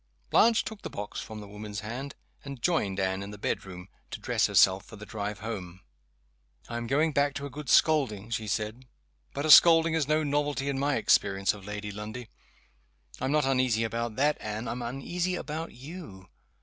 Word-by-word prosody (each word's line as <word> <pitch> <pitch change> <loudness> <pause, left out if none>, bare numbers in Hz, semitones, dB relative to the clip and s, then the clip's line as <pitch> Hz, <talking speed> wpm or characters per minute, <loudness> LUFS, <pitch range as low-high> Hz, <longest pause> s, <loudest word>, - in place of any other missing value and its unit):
Blanche 230 0 +5
took 220 -2 -7
the - - -6
box 105 0 -6
from 110 -1 -8
the 105 - -10
woman's 105 0 -7
hands, 125 +6 -6 0.3
and 140 -2 -7
joined 100 - +1
Anne 95 0 0
in 100 - -6
the 105 - -9
bedroom, 90 -2 -4 0.2
to - - -6
dress - - +1
herself 95 +1 +4
for 110 - -13
the 110 0 -10
drive 105 -1 -5
home. 95 -5 -6 0.9
"I 120 - -4
am 120 0 -4
going 150 +5 +2
back 140 -1 +1
to 140 - -4
a 140 - -7
good 145 0 -7
scolding," 115 -9 +3
she 110 -1 -2
said. 110 +5 -3 0.5
"But 140 +2 -3
a 155 - +4
scolding 165 0 +8
is 160 -4 +1
no 155 +1 +2
novelty 145 -1 0
in 135 -1 -1
my 140 0 +1
experience 100 0 +2
of 100 -1 -12
Lady 105 0 -5
Lundie. 110 +3 -7 0.9
I'm 130 +2 -1
not 150 -2 +2
uneasy 130 -4 +2
about 115 0 -3
that, 145 +4 +2
Anne 110 +2 -4
I'm 120 +2 -4
uneasy 170 +9 -2
about 160 0 -5
you. 130 - -10
120 Hz, 190 wpm, -28 LUFS, 105-145 Hz, 0.9 s, scolding